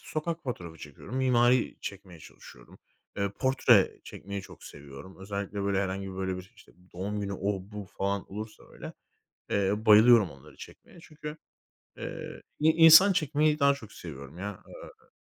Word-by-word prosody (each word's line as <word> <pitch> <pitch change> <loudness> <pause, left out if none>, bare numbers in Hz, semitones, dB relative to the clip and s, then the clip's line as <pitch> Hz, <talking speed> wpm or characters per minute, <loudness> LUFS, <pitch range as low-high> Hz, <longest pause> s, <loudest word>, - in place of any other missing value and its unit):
Sokak 165 +2 -4
fotoğrafı 85 - -6
çekiyorum. 75 - -9
Mimari 125 -1 +2
çekmeye 95 -4 -8
çalışıyorum. - - -15 0.4
Eee, 100 -1 -1
portre 130 -6 +3
çekmeyi 100 0 -7
çok - - -14
seviyorum. 70 +6 -12
Özellikle, 100 +1 -5
böyle, 100 -1 0
herhangi, 95 0 -4
böyle, 95 -1 -3
bir, 95 +4 -11
işte, 110 - -19 0.2
doğum 100 +4 -4
günü, 100 -1 -4
o 100 +1 -2
bu 105 -1 -6
falan 100 0 -2
olursa 110 +1 -8
öyle, - - -9 0.6
eee, 100 -1 +1
bayılıyorum 110 -2 +7
onları 70 -1 -16
çekmeye. - - -14
Çünkü, 150 -1 -9 0.6
eee, - - -8 0.2
i 155 - +4
insan 165 +4 +8
çekmeyi 155 -3 +1
daha 140 -1 +4
çok 110 -6 -12
seviyorum 70 -1 -10
ya, 100 +2 -4 0.2
ııı - - -14
100 Hz, 150 wpm, -28 LUFS, 95-130 Hz, 0.6 s, insan